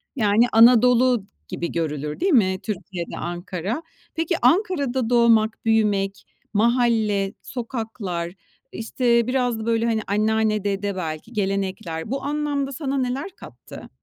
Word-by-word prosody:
Yani, 220 0 +3
Anadolu 245 0 +5 0.2
gibi 170 -2 -4
görülür 150 -3 -3
değil 375 -1 +2
mi 190 -7 +3
Türkiye'de 185 -4 -5
Ankara? 180 - -4 0.3
Peki, 325 +2 0
Ankara'da 265 - +2
doğmak, 230 -2 +3
büyümek, 205 -3 +1 0.3
mahalle, 220 -3 +2
sokaklar, 220 -8 -5 0.4
işte, 235 0 +1
biraz 250 -3 0
da, 220 - -5
böyle, 230 0 +1
hani, 225 -2 +1
anneanne, 215 0 +1
dede, 200 -1 -2
belki 160 +5 -5
gelenekler, 190 -3 -3
bu 270 - -2
anlamda 290 -1 -1
sana 275 0 -3
neler 260 +7 -2
kattı? - - -12
225 Hz, 120 wpm, -23 LUFS, 195-250 Hz, 0.4 s, Anadolu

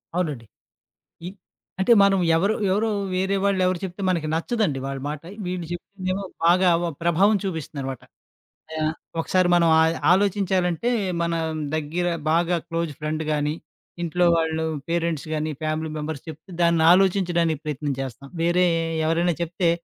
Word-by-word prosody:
అవునండి. 150 -10 -2 0.8
ఈ - - -3 0.5
అంటే 190 +5 +4
మనం 195 -1 +4 0.2
ఎవరు 200 +6 +2 0.2
ఎవరో 215 +3 +1 0.3
వేరే 190 +2 0
వాళ్ళెవరు 185 -2 +2
చెప్తే 185 +1 -7
మనకి 165 -4 -1
నచ్చదండి 170 - 0
వాళ్ళ 135 0 -4
మాట. 150 0 -5 0.2
వీళ్ళు 180 -1 -3
చెప్పిందేమో 185 +2 -4 0.2
బాగా 180 +1 +5
వ 170 - -1
ప్రభావం 185 +5 +4
చూపిస్తుందనమాట. 140 -7 -4 0.8
ఆహ్, 155 0 0 0.3
ఒకసారి 185 +2 +2
మనం 170 -1 +4
ఆయ్ 160 +1 +3 0.2
ఆలోచించాలంటే 190 0 +1 0.3
మన 170 0 0 0.4
దగ్గర 160 +3 -2 0.2
బాగా 170 +2 +2
క్లోజ్ 165 -2 -2
ఫ్రెండ్ 155 +1 -2
గాని, 150 0 0 0.5
ఇంట్లో 175 +1 +1
వాళ్ళు 160 0 0 0.3
పేరెంట్స్ 165 -3 -1
గాని, 155 0 -1
ఫ్యామిలీ 155 +1 -2
మెంబర్స్ 150 -1 -5
చెప్తే, 160 +5 -11
దాన్ని 170 -1 +3
ఆలోచించడానికి 175 -4 +2
ప్రయత్నం 145 -1 -2
చేస్తాం. 135 +1 -7
వేరే 175 +2 +3 0.4
ఎవరైనా 170 +1 +1
చెప్తే 170 +1 0
170 Hz, 135 wpm, -24 LUFS, 155-185 Hz, 0.8 s, బాగా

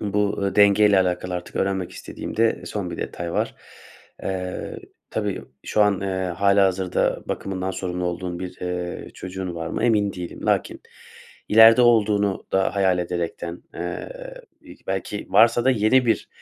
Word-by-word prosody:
bu, 105 0 0
eee, 100 - -1
denge 105 +1 +6
ile 100 -2 +5
alakalı 90 0 -1
artık 90 - -6
öğrenmek 95 -2 -1
istediğim - - -8
de 115 0 +2
son 100 -4 -4
bir - - -5
detay 85 -1 -5
var. - - -1 0.7
Eee, 90 -1 -4 0.3
tabii - - -2 0.2
şu 105 - +2
an, 100 -2 +2
eee, 95 -1 -2
hâlihazırda 95 0 +2
bakımından 95 -1 -3
sorumlu 90 -1 -3
olduğun 90 0 -3
bir, 90 0 -7
eee, 90 0 -4
çocuğun 95 -1 -6
var 80 -1 -4
mı, 85 - -2
emin 105 -4 +2
değilim. 90 -1 -7
Lakin - - 0 0.7
ileride 115 +3 +8
olduğunu 105 -4 +3
da 95 +1 +1
hayal 95 -2 +2
ederekten, 85 0 -4
eee, 85 - -5 0.5
i - - -13
belki - - -3
varsa 115 +1 +5
da 130 - +5
yeni 125 +2 +3
bir, 115 - +1
95 Hz, 155 wpm, -23 LUFS, 90-105 Hz, 0.7 s, ileride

